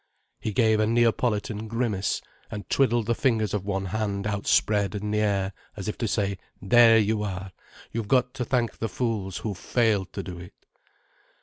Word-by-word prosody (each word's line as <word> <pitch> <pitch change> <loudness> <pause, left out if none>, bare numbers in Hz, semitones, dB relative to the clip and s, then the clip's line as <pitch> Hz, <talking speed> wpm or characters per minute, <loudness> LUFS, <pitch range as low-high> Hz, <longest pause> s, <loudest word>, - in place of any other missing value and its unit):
He 110 - -3
gave 110 0 +3
a 110 - +3
Neapolitan 115 -1 +1
grimace, 110 -4 -1 0.3
and 105 -2 -7
twiddled 120 -4 +3
the 115 - +1
fingers 115 -8 +1
of 100 -1 -2
one 95 -1 -1
hand 100 0 -2
outspread 105 0 +1
in 105 +1 -3
the 105 - +1
air, 100 -2 0 0.2
as 95 - -5
if 105 - -2
to 115 - 0
say: 100 -3 -1 0.2
"There 115 +3 +6
you 110 0 +2
are! 95 -2 -4 0.4
You've 115 -2 -3
got 125 +1 +2
to 130 - -3
thank 120 -2 -1
the 115 - -2
fools 100 -4 -2
who've 105 -3 -4
failed 105 -2 +1
to - - -4
do 90 -2 -7
it." 90 0 -11
105 Hz, 180 wpm, -26 LUFS, 100-115 Hz, 0.4 s, There